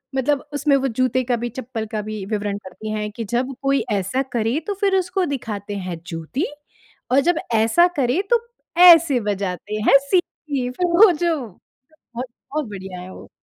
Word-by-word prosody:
मतलब 270 +2 0
उसमें 290 -1 +2
वो 270 0 0
जूते 255 +1 +1
का 245 0 0
भी, 240 +1 -3
चप्पल 235 -2 -5
का 215 -1 -2
भी, 215 -1 -6
विवरण 205 -1 -2
करती 210 +2 -8
है 210 0 -2
कि 225 +2 -6
जब 250 +5 -1
कोई 275 -2 +2
ऐसा 200 +6 0 0.2
करे 230 +7 +1
तो 410 - 0
फिर 395 -1 +3
उसको 370 0 0
दिखाते 205 -4 -6
हैं 170 -3 -5
जूती 165 - -3 0.7
और 265 - +5
जब 345 - +2 0.2
ऐसा 225 +11 +4
करे 265 +7 +2
तो 470 0 +3 0.4
ऐसे 330 -6 +7
बजाते 200 0 -3
हैं - - +8
सीटी। 345 +6 +2 0.5
फिर 360 +8 -1
वो 365 +4 +7
जो 340 0 0
बहुत 205 +4 -24 0.7
बहुत 305 -2 -1
बढ़िया 190 -2 -7
है 185 - -9
वो। - - -12
245 Hz, 180 wpm, -21 LUFS, 210-295 Hz, 0.7 s, हैं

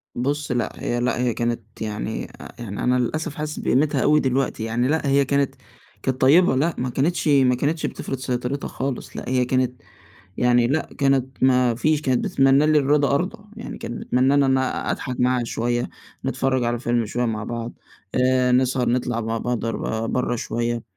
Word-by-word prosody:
بُص 145 +3 -2
لأ، 120 -1 0
هي 120 - -1
لأ 125 0 0
هي 125 -2 +1
كانت 115 -3 -4
يعني 110 0 -3 0.2
آآ، - - -10
يعني 105 -4 -5
أنا 125 - +3
للأسف 155 +5 -2
حاسس 150 0 -4
بقيمتها 145 +4 +1
أوي 150 +1 +4
دلوقتي 130 -4 0
يعني 115 +3 0
لأ 155 0 0
هي 140 0 +3
كانت 140 0 0 0.5
كانت 130 -1 -1
طيّبة 145 +2 +5
لأ، 155 +5 +1
ما 125 - -2
كانتش 155 +7 0
ما 135 -4 +4
كانتش 150 +5 -1
بتفرض 135 - -4
سيطرتها 125 +2 -3
خالص 135 -1 -5
لأ، - - -5
هي 125 -1 +2
كانت 125 -1 0 0.6
يعني 120 -1 +3
لأ 150 +5 -1
كانت 135 -2 +1
ما 125 -2 +4
فيش 155 +5 +1
كانت 130 -4 +1
بتتمنّى 135 +2 +4
لي 155 0 +4
الرضا 140 0 +2
أرضى، 185 +9 -1 0.2
يعني - - -7
كانت 120 - -6
بتتمنّى 130 +2 +2
إن 145 0 +4
أنا 130 -1 0
أضحك 130 -2 -4
معاها 125 -1 +2
شوية، 120 +1 -1 0.4
نتفرج 130 0 0
على 120 0 -1
فيلم 120 -2 0
شوية 120 +3 -1
مع 110 -2 -2
بعض 115 0 -5 0.4
آآ، 125 0 +3
نسهر 125 -1 +2
نطلع 120 -1 0
مع 115 +1 -2
بعض 120 0 -2
ر 115 0 -2
برة 125 0 0
شوية 120 0 -2
125 Hz, 185 wpm, -23 LUFS, 120-140 Hz, 0.6 s, طيّبة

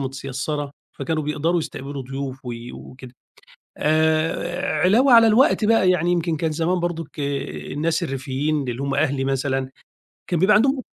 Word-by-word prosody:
متيسرة، 135 +2 -4 0.3
فكانوا 155 +3 -2
بيقدروا 155 +4 0
يستقبلوا 140 -2 -6
ضيوف 135 0 -6
و 120 - -4 0.2
وكده. 130 -1 -12 0.6
آآ، 160 +3 +1
علاوة 240 +9 +4
على 230 -1 +8
الوقت 225 +1 +4
بقى 210 -4 +4
يعني 175 -1 +1
يمكن 170 -2 0
كان 160 +1 -1
زمان 170 +3 0
برضُك 165 -3 -4
الناس 145 +3 -2
الريفيّين 140 0 -2
اللي 125 +2 -3
هم 140 0 -1
أهلي 140 -2 0
مثلًا 135 -1 -1 0.6
كان 175 - 0
بيبقى 200 +4 +5
عندهم 265 +5 +3
155 Hz, 140 wpm, -22 LUFS, 135-175 Hz, 0.6 s, على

